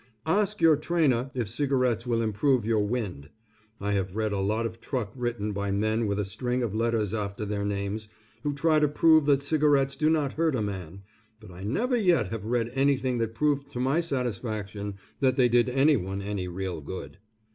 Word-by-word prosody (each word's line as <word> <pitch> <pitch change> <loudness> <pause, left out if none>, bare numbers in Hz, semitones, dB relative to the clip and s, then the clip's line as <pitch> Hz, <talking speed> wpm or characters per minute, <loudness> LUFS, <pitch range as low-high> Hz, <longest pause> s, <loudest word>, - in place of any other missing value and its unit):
Ask 210 +5 +1
your 160 -3 +6
trainer 145 -6 +1
if 120 -4 -1
cigarettes 125 -1 0
will 115 -1 +1
improve 115 +3 +1
your 110 -2 +2
wind. 100 - -3 0.5
I 100 +1 -2
have 95 -1 -1
read 110 -1 0
a 100 - -1
lot 110 +4 0
of 115 0 -6
truck 115 -7 -3
written 120 -4 -2
by 100 0 -2
men 110 +3 +1
with 100 0 -1
a 105 - 0
string 125 +5 -2
of 110 -4 -2
letters 110 -2 0
after 105 0 -3
their 100 0 -2
names, 100 +1 -3 0.3
who 145 +1 -2
try 155 +2 +3
to 150 - +3
prove 155 +1 +4
that 140 -1 +3
cigarettes 145 -2 +2
do 155 0 +2
not 150 -4 +1
hurt 160 -3 +1
a 115 - 0
man, 95 -2 -6 0.4
but 105 -3 -13
I 90 +1 -11
never 235 - 0
yet 175 - +2
have 110 -2 -5
read 120 0 0
anything 135 -2 +1
that 115 -1 -2
proved 140 +2 0
to 125 - -4
my 135 +6 +2
satisfaction 110 - -3 0.2
that 130 -2 +2
they 125 -2 +5
did 120 +1 +3
anyone 125 -8 +2
any 100 -2 -3
real 90 -2 -4
good. 95 +5 -8
115 Hz, 195 wpm, -27 LUFS, 105-140 Hz, 0.5 s, your